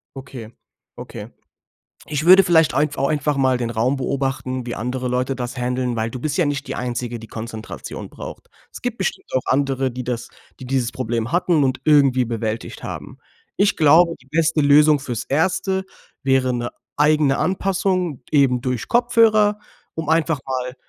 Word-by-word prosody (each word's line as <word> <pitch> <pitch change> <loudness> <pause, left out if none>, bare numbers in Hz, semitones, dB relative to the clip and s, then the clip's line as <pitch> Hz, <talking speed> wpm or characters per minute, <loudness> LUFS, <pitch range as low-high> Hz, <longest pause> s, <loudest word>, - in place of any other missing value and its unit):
Okay, 130 -4 -9 0.5
Okay. - - -8 0.8
Ich 155 0 -3
würde 185 +2 +8
vielleicht 165 -3 +4
einf 145 -1 0
auch 135 - +1
einfach 150 -1 0
mal 130 -2 +2
den 120 -1 -3
Raum 120 +5 0
beobachten, 130 -1 -2
wie 120 - -4
andere 125 +2 -3
Leute 125 +2 -1
das 125 0 -5
handeln 125 0 -1
weil 110 +1 -1
du 125 - -7
bist 150 0 -2
ja 175 - +3
nicht 145 -1 -2
die - - -4
Einzige, 120 -1 -4
die 115 - -11
Konzentration 110 0 -7
braucht. - - -10 0.2
Es - - -10
gibt 245 -2 -3
bestimmt 190 - -3
auch 130 - +2
andere, 135 -1 +1
die 125 +1 -6
das 120 -2 -4 0.3
die - - -7
dieses 125 -2 -1
Problem 115 -2 -2
hatten 175 -3 +2
und 130 0 -1
irgendwie 140 -4 +4
bewältigt 115 -1 -4
haben. - - -7 0.4
Ich 200 0 +3
glaube, 165 +2 +5
die 130 - -23
beste 160 +1 +1
Lösung 150 +1 +5
fürs 120 -5 -4
Erste 190 +5 0 0.4
wäre 130 -1 +2
'ne 120 0 -3 0.2
eigene 150 -2 +3
Anpassung 185 -5 -1
eben 135 -4 +3
durch 125 -2 -3
Kopfhörer, 225 -4 +3 0.3
um 160 -1 -5
einfach 160 -2 +2
mal 125 -1 -3
135 Hz, 170 wpm, -21 LUFS, 125-160 Hz, 0.8 s, würde